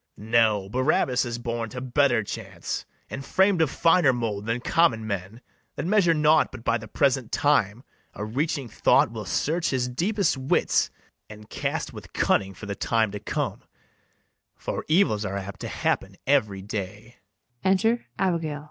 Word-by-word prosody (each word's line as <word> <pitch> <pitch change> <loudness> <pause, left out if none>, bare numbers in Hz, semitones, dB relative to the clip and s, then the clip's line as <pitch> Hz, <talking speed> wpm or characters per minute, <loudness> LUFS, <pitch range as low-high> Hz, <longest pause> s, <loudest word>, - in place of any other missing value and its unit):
No, 110 -2 +2
Barabas 130 +2 +1
is 120 -1 -3
born 115 -1 -3
to 125 - -6
better 125 -2 +2
chance, - - -6 0.2
And 135 - -6
fram'd 190 +3 +3
of 160 - +3
finer 165 -2 +4
mould 110 -4 -3
than 115 +2 0
common 120 -5 +2
men, 100 +2 -5 0.3
That - - -4
measure 180 -3 +3
naught 150 +1 +4
but 130 -3 -10
by 115 0 +1
the 110 - -10
present 130 0 +1
time. 120 -5 +1 0.3
A 105 - -4
reaching 140 +4 -2
thought - - +3
will - - -6
search 165 +3 0
his 125 -2 0
deepest 180 - 0
wits, 130 0 +1 0.4
And 105 0 -12
cast - - -3
with - - -11
cunning 95 0 +1
for 105 - -9
the 100 - -3
time 110 0 0
to 105 - -5
come; - - -3 0.9
For - - -5
evils 155 - +3
are 100 -1 -3
apt 100 0 -7
to - - -5
happen 95 0 -1
every 105 -9 +1
day. 105 +3 -6
120 Hz, 155 wpm, -25 LUFS, 105-145 Hz, 0.9 s, finer